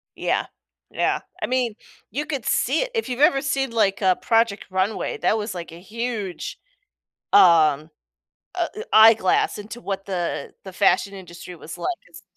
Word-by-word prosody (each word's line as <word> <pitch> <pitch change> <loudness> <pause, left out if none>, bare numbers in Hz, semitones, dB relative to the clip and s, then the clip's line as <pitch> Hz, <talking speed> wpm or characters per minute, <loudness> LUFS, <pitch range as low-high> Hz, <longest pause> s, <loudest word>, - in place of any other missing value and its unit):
Yeah. - - -1 0.4
Yeah. - - 0 0.2
I - - -1
mean, 250 -3 0 0.3
you 295 +3 -3
could 280 -6 -4
see 275 +6 +1
it. - - -3
If 455 -2 -2
you've 250 0 -4
ever 275 -2 +5
seen, 270 -2 -1
like, 215 -4 +1
a 185 -2 +3
Project 225 -3 +1
Runway, 190 +3 -1
that 220 - +2
was, 210 -2 -4
like, 170 -2 -7
a 165 - -11
huge, 225 - -5 0.7
um, 160 -5 +5 0.7
uh 345 -2 0
eh 430 - -5
eyeglass 220 -3 +5
into 215 +3 -8
what 195 -1 -4
the 180 -3 -3
the 190 - -9
fashion 195 +1 +2
industry 180 -1 -10
was 165 -1 -10
like 365 - -2
it’s 175 0 -14
210 Hz, 165 wpm, -23 LUFS, 185-250 Hz, 0.7 s, ever